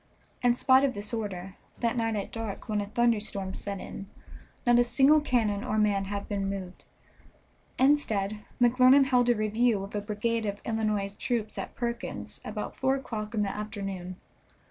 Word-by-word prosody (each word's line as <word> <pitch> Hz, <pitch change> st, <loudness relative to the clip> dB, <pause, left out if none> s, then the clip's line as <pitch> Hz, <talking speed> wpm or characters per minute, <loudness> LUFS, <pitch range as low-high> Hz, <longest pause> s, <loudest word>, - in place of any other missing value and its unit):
In 245 Hz, -1 st, +4 dB
spite 260 Hz, +1 st, +5 dB
of 270 Hz, -4 st, +1 dB
this 205 Hz, +2 st, -4 dB
order, 195 Hz, -4 st, -4 dB, 0.2 s
that 235 Hz, 0 st, 0 dB
night 225 Hz, -2 st, 0 dB
at 200 Hz, -2 st, -4 dB
dark, 225 Hz, -2 st, -5 dB
when 210 Hz, -2 st, 0 dB
a 200 Hz, -, -4 dB
thunderstorm 210 Hz, -4 st, 0 dB
set 200 Hz, -1 st, -4 dB
in, 195 Hz, -, -8 dB, 0.6 s
not 240 Hz, 0 st, +5 dB
a -, -, +6 dB
single 275 Hz, +5 st, +5 dB
cannon 220 Hz, -8 st, +1 dB
or 215 Hz, -, -1 dB
man 205 Hz, -2 st, +2 dB
had 200 Hz, +1 st, -4 dB
been 200 Hz, -1 st, -2 dB
moved. 190 Hz, -2 st, -6 dB, 0.9 s
Instead, 215 Hz, -7 st, +2 dB, 0.2 s
McClernand 255 Hz, +3 st, +6 dB
held 250 Hz, -2 st, +3 dB
a 240 Hz, -, +5 dB
review 215 Hz, 0 st, +1 dB
of 195 Hz, -, -9 dB
a 205 Hz, -, -1 dB
brigade 220 Hz, +2 st, -1 dB
of 200 Hz, 0 st, -3 dB
Illinois 215 Hz, -3 st, -1 dB
troops 225 Hz, -3 st, -1 dB
at -, -, -6 dB
Perkins's 235 Hz, -1 st, -4 dB
about -, -, -5 dB
four 265 Hz, 0 st, +1 dB
o'clock 230 Hz, -4 st, -5 dB
in 210 Hz, -, +2 dB
the 195 Hz, -, -3 dB
afternoon. 195 Hz, -4 st, -5 dB
215 Hz, 170 wpm, -28 LUFS, 200-240 Hz, 0.9 s, a